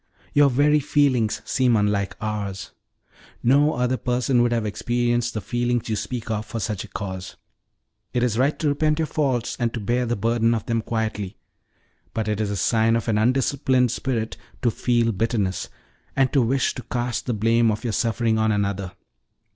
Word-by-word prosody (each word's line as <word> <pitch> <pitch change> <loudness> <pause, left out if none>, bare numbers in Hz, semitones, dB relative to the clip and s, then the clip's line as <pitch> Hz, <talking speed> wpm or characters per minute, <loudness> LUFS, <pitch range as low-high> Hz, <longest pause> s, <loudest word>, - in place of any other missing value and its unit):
Your 145 -1 +6
very 145 +4 +3
feelings 135 -6 +1
seem 125 -3 +2
unlike 105 -2 0
ours. 100 -4 -4 0.7
No 145 +5 +4
other 125 +1 0
person 125 +2 +1
would 120 0 +2
have 115 -2 0
experienced 120 +2 0
the 110 - -2
feelings 120 +3 -1
you 110 - 0
speak 115 +1 -4
of 105 -1 -1
for 115 - -4
such 105 -2 -3
a - - -10
cause. 95 -2 -6 0.8
It 125 - 0
is 120 -3 +1
right 135 +5 +2
to 155 - 0
repent 150 +1 +1
your 160 - +1
faults, 135 -7 -1
and 120 -2 +1
to - - -2
bear 120 +4 0
the 120 - 0
burden 115 +2 +2
of 110 - -4
them 115 -1 0
quietly; 110 -3 -3 0.8
but 110 -1 -1
it 105 0 -1
is 105 - -1
a 100 - -2
sign 110 +3 +2
of 115 - -2
an 105 -1 +2
undisciplined 130 +1 +2
spirit 115 -4 -2 0.3
to 120 - +3
feel 120 0 +1
bitterness, 105 -3 -1 0.5
and 135 -1 +2
to 140 - +4
wish 125 +3 +1
to - - -6
cast 120 +1 -3
the 125 - +1
blame 115 +2 +3
of 110 +2 -2
your 115 -3 -2
suffering 115 -1 +1
on 110 0 +2
another. 100 -2 -1
115 Hz, 185 wpm, -23 LUFS, 110-125 Hz, 0.8 s, Your